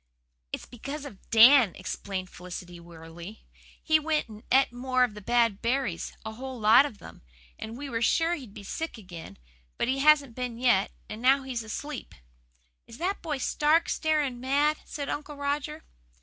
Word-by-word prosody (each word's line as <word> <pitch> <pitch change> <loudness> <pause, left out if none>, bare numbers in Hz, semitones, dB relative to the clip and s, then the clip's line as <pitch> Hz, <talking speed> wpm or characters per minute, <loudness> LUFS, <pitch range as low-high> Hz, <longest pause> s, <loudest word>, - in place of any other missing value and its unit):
"It's - - -5
because 280 +5 -7
of 210 -9 -12
Dan," 230 -2 +7
explained 185 -2 -5
Felicity 180 -1 -8
wearily. 170 +4 -11 0.4
"He 315 -1 +4
went 310 0 0
and 215 -1 -11
et 265 -1 +4
more 255 +1 +1
of 245 -4 0
the 210 - -9
bad 230 -1 +2
berries 235 -7 -1
a 220 - -4
whole 260 +2 -7
lot 225 +6 +6
of 225 - -12
them - - -13 0.4
and 225 +2 -7
we 285 +2 -6
were 230 -4 -3
sure 330 +8 +3
he'd 255 -11 -7
be - - -9
sick 320 +8 -5
again. 175 - -10 0.4
But 235 - 0
he 265 +1 0
hasn't 290 -3 +5
been 245 -1 -4
yet, 240 -6 +3 0.2
and 215 +1 -7
now 270 +2 +4
he's 255 -3 -3
asleep." 255 +6 -6 0.7
"Is 230 - -12
that 375 +6 -2
boy 310 -4 -2
stark, 300 +5 +2
staring 300 -6 0
mad?" 285 +4 +2
said 285 -2 -5
Uncle 295 0 -4
Roger. 290 +2 -3
255 Hz, 175 wpm, -28 LUFS, 215-290 Hz, 0.7 s, Dan